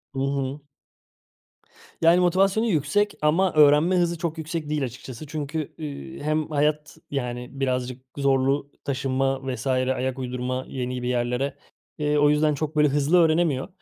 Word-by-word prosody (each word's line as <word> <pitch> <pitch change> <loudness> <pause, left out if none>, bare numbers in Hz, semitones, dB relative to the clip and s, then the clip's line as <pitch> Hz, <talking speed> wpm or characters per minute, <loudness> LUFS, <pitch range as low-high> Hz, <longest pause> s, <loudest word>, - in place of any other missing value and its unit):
Hı - - -2
hı. 140 +1 -2 1.4
Yani 165 +2 +6
motivasyonu 190 +5 +3
yüksek 205 +4 +1
ama 165 +4 +2
öğrenme 150 +4 +5
hızı 170 -1 +1
çok 165 0 -3
yüksek 160 -1 -4
değil 150 -2 0
açıkçası 130 +2 -7
çünkü, 150 +1 -4
ııı, 150 +2 -7
hem 155 +1 0
hayat, 150 0 0
yani, 125 -3 -3
birazcık 130 -1 -1 0.2
zorlu 140 +1 +1
taşınma 135 0 0
vs. 125 +2 -5
ayak 130 0 0
uydurma 125 0 -3
yeni 125 -1 -4
bir - - -2
yerlere, 125 +2 -1 0.4
eee, 150 0 +1
o 145 0 +5
yüzden 150 +1 +3
çok, 155 +2 -4
böyle, 150 0 +5
hızlı 145 +4 +2
öğrenemiyor. 160 -4 +2
145 Hz, 145 wpm, -24 LUFS, 130-155 Hz, 1.4 s, Yani